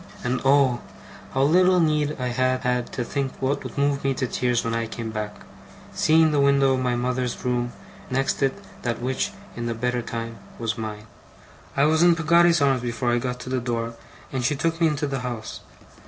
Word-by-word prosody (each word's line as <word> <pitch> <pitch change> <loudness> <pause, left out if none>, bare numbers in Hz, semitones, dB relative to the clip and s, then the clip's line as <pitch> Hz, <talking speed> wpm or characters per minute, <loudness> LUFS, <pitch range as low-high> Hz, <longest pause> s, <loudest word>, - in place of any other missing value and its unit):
And 125 +1 -1
oh, 135 -3 +4 0.5
how 135 - +3
little 180 +5 +5
need 150 -2 +2
I 125 -1 -1
had 130 +1 +1
had 125 -1 0
to 125 - -2
think 135 +1 -3
what 135 +2 -1
would - - -8
move 140 0 +1
me 135 -1 +1
to 130 - -1
tears 125 -1 0
when 115 - -2
I 115 0 -1
came 110 0 -5
back 105 -1 -5 0.5
seeing 160 0 +4
the 145 - +2
window 140 -1 +4
of 130 - 0
my 125 -1 0
mother's 125 0 -2
room, 120 -1 0 0.4
and 130 - -1
next 135 0 0
it 135 -1 +2 0.3
that 120 -1 -2
which, 130 +9 -1 0.3
in 120 0 -3
the 115 - -2
better 125 +1 -1
time, 115 -1 -5 0.2
was 115 -1 -2
mine! 110 -2 -6 0.7
I 140 - +4
was 155 +2 +4
in 175 -1 +6
Peggotty's 170 0 +4
arms 135 -3 +3
before 120 0 -1
I 120 - +2
got 125 0 -3
to 130 - -7
the 130 - +1
door, 115 -1 -2 0.4
and 130 -2 -2
she 145 +4 +1
took 165 +3 -1
me 165 - +6
into 150 -1 -1
the 135 -2 -2
house. 120 -3 -5
130 Hz, 210 wpm, -24 LUFS, 120-140 Hz, 0.7 s, in